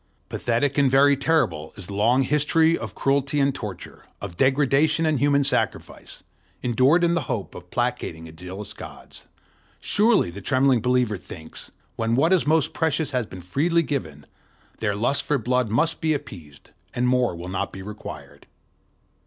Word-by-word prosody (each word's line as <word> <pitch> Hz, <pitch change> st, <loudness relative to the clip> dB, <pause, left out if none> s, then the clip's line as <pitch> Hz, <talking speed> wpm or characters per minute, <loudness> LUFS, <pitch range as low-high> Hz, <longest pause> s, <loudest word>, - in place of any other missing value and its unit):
Pathetic 125 Hz, +4 st, 0 dB
and 140 Hz, -2 st, +4 dB
very 140 Hz, +2 st, +5 dB
terrible 135 Hz, -, 0 dB
is 100 Hz, -, -6 dB
the 100 Hz, -, -8 dB
long 120 Hz, +6 st, +3 dB
history 155 Hz, +4 st, +2 dB
of 110 Hz, -, -7 dB
cruelty 140 Hz, +1 st, +1 dB
and 140 Hz, 0 st, +2 dB
torture, 105 Hz, -8 st, -8 dB, 0.2 s
of 95 Hz, -4 st, -7 dB
degradation 145 Hz, -, +2 dB
and 155 Hz, -4 st, +1 dB
human 140 Hz, +1 st, +3 dB
sacrifice, -, -, -2 dB, 0.4 s
endured 130 Hz, +8 st, +3 dB
in 170 Hz, 0 st, +3 dB
the 170 Hz, -, +1 dB
hope 100 Hz, -5 st, -3 dB
of 90 Hz, 0 st, -11 dB
placating 120 Hz, -9 st, -2 dB
the 80 Hz, -, -10 dB
jealous 90 Hz, +5 st, -8 dB
gods: -, -, -10 dB, 0.5 s
surely, 210 Hz, -, +2 dB
the 100 Hz, +4 st, -9 dB
trembling 130 Hz, +1 st, +2 dB
believer 125 Hz, -3 st, +1 dB
thinks, 80 Hz, -3 st, -11 dB, 0.3 s
when 115 Hz, 0 st, 0 dB
what 160 Hz, +8 st, +3 dB
is 180 Hz, -5 st, +2 dB
most 155 Hz, -1 st, +2 dB
precious 160 Hz, -2 st, 0 dB
has 125 Hz, -5 st, -1 dB
been 90 Hz, -3 st, -10 dB
freely 165 Hz, -, +1 dB
given, 80 Hz, -, -4 dB, 0.5 s
their 105 Hz, -3 st, -1 dB
lust 120 Hz, +7 st, +1 dB
for 150 Hz, -, 0 dB
blood 125 Hz, -1 st, 0 dB
must 140 Hz, +10 st, +1 dB
be 155 Hz, -1 st, +2 dB
appeased, 75 Hz, -, -10 dB, 0.2 s
and 125 Hz, +1 st, +1 dB
more 125 Hz, -6 st, +2 dB
will 85 Hz, +1 st, -8 dB
not 95 Hz, 0 st, -3 dB
be 95 Hz, -, -9 dB
required. 105 Hz, +1 st, -10 dB
125 Hz, 165 wpm, -24 LUFS, 100-145 Hz, 0.5 s, very